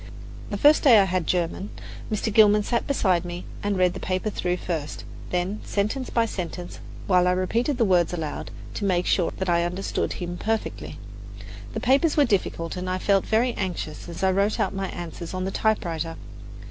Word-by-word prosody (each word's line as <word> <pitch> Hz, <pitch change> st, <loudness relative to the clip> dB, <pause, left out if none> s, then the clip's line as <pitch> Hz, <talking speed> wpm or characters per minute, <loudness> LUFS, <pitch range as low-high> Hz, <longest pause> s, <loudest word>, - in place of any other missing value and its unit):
The 205 Hz, -, -2 dB
first 295 Hz, +8 st, +6 dB
day 245 Hz, -6 st, +7 dB
I 200 Hz, -, +7 dB
had 185 Hz, -3 st, -1 dB
German. 180 Hz, +3 st, -1 dB, 0.4 s
Mr. 215 Hz, 0 st, -1 dB
Gilman 210 Hz, -1 st, +6 dB
sat 235 Hz, +2 st, -1 dB
beside 190 Hz, -11 st, +2 dB
me 175 Hz, 0 st, -6 dB, 0.2 s
and 205 Hz, -1 st, 0 dB
read 180 Hz, -1 st, +3 dB
the -, -, -6 dB
paper 185 Hz, +3 st, -1 dB
through 180 Hz, -2 st, -1 dB
first, 160 Hz, -5 st, -4 dB, 0.3 s
then 180 Hz, +4 st, -1 dB
sentence 215 Hz, +6 st, -1 dB
by 230 Hz, -1 st, +2 dB
sentence, 180 Hz, -4 st, -5 dB, 0.3 s
while 180 Hz, -2 st, +4 dB
I 180 Hz, -, +4 dB
repeated 230 Hz, +9 st, 0 dB
the 235 Hz, -, +3 dB
words 180 Hz, -4 st, +3 dB
aloud, 165 Hz, -4 st, -4 dB, 0.2 s
to -, -, -4 dB
make 180 Hz, -3 st, +1 dB
sure 175 Hz, -3 st, +2 dB
that 190 Hz, -, -2 dB
I 170 Hz, -1 st, +3 dB
understood 180 Hz, +3 st, -2 dB
him 175 Hz, -1 st, -5 dB
perfectly. 220 Hz, 0 st, -3 dB, 0.8 s
The -, -, 0 dB
papers 280 Hz, +6 st, +3 dB
were 290 Hz, -, +6 dB
difficult, 185 Hz, -6 st, -1 dB
and 180 Hz, 0 st, -4 dB
I 185 Hz, -, 0 dB
felt 195 Hz, +1 st, +2 dB
very 235 Hz, +3 st, +2 dB
anxious 175 Hz, -6 st, -4 dB
as 170 Hz, -, -6 dB
I 190 Hz, -, +4 dB
wrote 200 Hz, +3 st, +1 dB
out -, -, +1 dB
my 195 Hz, -1 st, -3 dB
answers 175 Hz, +1 st, -6 dB
on 185 Hz, 0 st, -2 dB
the 190 Hz, -, -2 dB
typewriter. 170 Hz, -8 st, -1 dB
185 Hz, 190 wpm, -25 LUFS, 175-215 Hz, 0.8 s, day